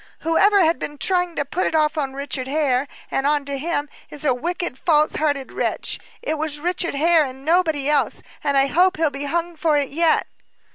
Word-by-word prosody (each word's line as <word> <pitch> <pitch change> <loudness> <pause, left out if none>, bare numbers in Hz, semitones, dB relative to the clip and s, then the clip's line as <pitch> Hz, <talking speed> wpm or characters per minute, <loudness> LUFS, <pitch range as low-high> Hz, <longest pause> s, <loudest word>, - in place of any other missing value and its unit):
"Whoever 390 +5 +4
has 325 +1 +2
been 295 - -6
trying 355 +1 0
to 285 - -1
put 345 +6 -1
it - - -2
off 305 0 +2
Richard 275 -2 -3
Hare, 280 -2 +1 0.2
and 270 +1 0
on 295 -1 +1
to 280 -1 -4
him, 295 -1 -2 0.2
is 295 0 -7
a 265 - +4
wicked, 345 +3 -3
false 305 +1 +2
hearted 285 -3 -1
wretch. - - -2 0.2
It 315 -10 -2
was 300 -1 -1
Richard 345 0 -1
Hare, 325 +2 +4
and 265 0 -8
nobody 320 -4 +2
else, 295 -1 +1 0.2
and 280 -1 +1
I 270 - +5
hope 360 +6 +2
he'll 315 -2 +1
be 280 +1 -5
hung 340 +3 -2
for 310 -1 +1
it 280 -2 0
yet." 325 +2 +2
300 Hz, 200 wpm, -21 LUFS, 280-335 Hz, 0.2 s, I